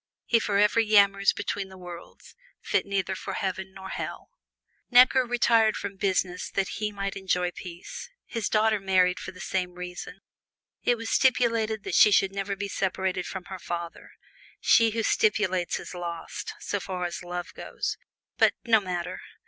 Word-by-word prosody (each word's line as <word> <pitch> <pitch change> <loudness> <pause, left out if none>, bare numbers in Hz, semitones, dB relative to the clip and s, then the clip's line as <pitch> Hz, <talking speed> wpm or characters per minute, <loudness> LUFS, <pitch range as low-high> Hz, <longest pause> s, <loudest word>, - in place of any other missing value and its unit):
He 230 - +3
forever 210 +1 +3
yammers 200 -2 +5
between 200 -1 -4
the 190 - -12
worlds, 175 -1 -11 0.3
fit - - 0
for - - -15
neither 190 -1 -1
Heaven 190 0 -4
nor 190 0 -9
Hell. - - -6 0.6
Necker 255 +1 +7
retired 230 -2 +3
from 200 -1 -5
business 185 -2 -1
that 195 -1 -1
he 210 -1 -1
might 200 -1 -4
enjoy 180 -2 0
peace; 175 - -9 0.2
his 230 -3 -3
daughter 215 0 +3
married 185 -2 +2
for - - -7
the 185 - -15
same 180 -1 -2
reason. 180 0 -7 0.6
It 245 - +2
was 225 0 -5
stipulated 230 -5 +2
that - - -5
she - - +7
should 195 -1 +3
never 200 0 -2
be 200 +1 -4
separated 190 -1 -1
from 190 -2 -6
her 190 -1 -7
father. 170 -1 -6 0.5
She 230 -1 +5
who 225 +1 -2
stipulates 195 -5 +1
is - - -9
lost, 170 -2 -6
so 205 - -2
far 185 -2 -4
as 175 - -4
love 175 0 -6
goes - - -4 0.4
but - - +5
no 225 -2 +5
matter! 180 -3 -4
195 Hz, 165 wpm, -27 LUFS, 180-215 Hz, 0.6 s, Necker